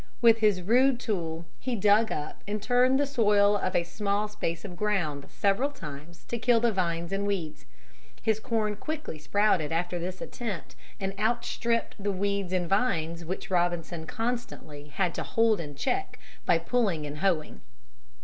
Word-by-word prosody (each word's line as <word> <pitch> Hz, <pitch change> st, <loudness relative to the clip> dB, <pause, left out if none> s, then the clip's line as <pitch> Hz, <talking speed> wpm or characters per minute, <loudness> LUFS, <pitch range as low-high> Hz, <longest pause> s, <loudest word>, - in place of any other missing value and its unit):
With 230 Hz, -1 st, +6 dB
his 205 Hz, -5 st, +3 dB
rude 245 Hz, +5 st, +4 dB
tool 170 Hz, -8 st, -3 dB
he 255 Hz, -1 st, -2 dB
dug 210 Hz, +2 st, +4 dB
up 150 Hz, -, -5 dB
and 210 Hz, +1 st, -2 dB
turned 250 Hz, +4 st, +3 dB
the 285 Hz, -, +3 dB
soil 210 Hz, -6 st, +4 dB
of 185 Hz, -2 st, -1 dB
a 170 Hz, -, +3 dB
small 200 Hz, +4 st, -1 dB
space 170 Hz, -5 st, -4 dB
of 180 Hz, -3 st, -7 dB
ground 175 Hz, -8 st, -1 dB
several 205 Hz, +8 st, +1 dB
times 155 Hz, -, -10 dB
to 235 Hz, -, -2 dB
kill 235 Hz, 0 st, +4 dB
the 235 Hz, 0 st, +3 dB
vines 170 Hz, -3 st, -1 dB
and 200 Hz, +1 st, -1 dB
weeds. 175 Hz, -7 st, -3 dB, 0.5 s
His 220 Hz, -1 st, +1 dB
corn 220 Hz, -3 st, -1 dB
quickly 305 Hz, -, -5 dB
sprouted 185 Hz, -2 st, +2 dB
after 175 Hz, +2 st, -1 dB
this 185 Hz, +2 st, -4 dB
attempt 210 Hz, -9 st, -5 dB, 0.2 s
and 195 Hz, -1 st, -2 dB
outstripped 230 Hz, -1 st, 0 dB
the 205 Hz, -, +1 dB
weeds 200 Hz, -1 st, -1 dB
and 180 Hz, -2 st, 0 dB
vines 170 Hz, -5 st, 0 dB
which 185 Hz, +3 st, -5 dB
Robinson 175 Hz, -2 st, 0 dB
constantly 225 Hz, -11 st, -4 dB
had 170 Hz, +4 st, -1 dB
to -, -, -3 dB
hold 225 Hz, -3 st, +2 dB
in 145 Hz, -3 st, -8 dB
check 390 Hz, -, -2 dB, 0.3 s
by 170 Hz, -, +5 dB
pulling 170 Hz, -3 st, 0 dB
and 145 Hz, +1 st, -6 dB
hoeing. 170 Hz, -4 st, 0 dB
200 Hz, 165 wpm, -28 LUFS, 170-225 Hz, 0.5 s, With